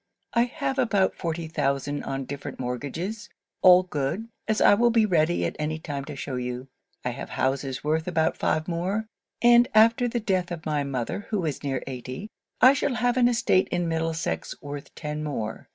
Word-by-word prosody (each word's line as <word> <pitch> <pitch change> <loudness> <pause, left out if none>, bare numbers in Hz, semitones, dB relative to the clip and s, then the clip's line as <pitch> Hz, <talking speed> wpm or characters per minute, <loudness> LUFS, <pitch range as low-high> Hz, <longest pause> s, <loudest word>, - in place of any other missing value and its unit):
'I 235 +1 +4
have 270 +1 -3
about 205 -6 +2
forty 165 -1 -3
thousand 145 -2 -1
on 135 -1 -3
different 140 +1 -7
mortgages; 145 - -4 0.3
all 185 0 +8
good, 180 +7 -3 0.2
as 220 0 +1
I - - +7
will 240 +4 +4
be 225 -2 +4
ready 175 -3 +2
at - - -3
any 155 +1 -1
time 145 -3 -5
to 150 - -7
shew 135 -1 -4
you. 125 +1 -4 0.4
I 125 - 0
have 125 - -7
houses 135 0 -1
worth 160 +2 0
about 160 -2 +1
five 155 0 0
more. 185 +5 -1 0.4
And 240 0 +7
after 230 +3 +5
the 240 0 -1
death 185 -5 0
of 170 -2 -6
my 150 -2 0
mother, 140 - -3
who 200 -6 -1
is 150 -4 -3
near 135 -2 -2
eighty, 130 - -7 0.3
I 260 +2 +9
shall 280 -2 0
have 245 0 +1
an 250 -1 +5
estate 235 -6 +2
in 175 -1 -1
Middlesex 165 0 -2
worth 145 0 -8
ten 150 -1 -4
more. 115 -8 -4
165 Hz, 185 wpm, -26 LUFS, 140-215 Hz, 0.4 s, I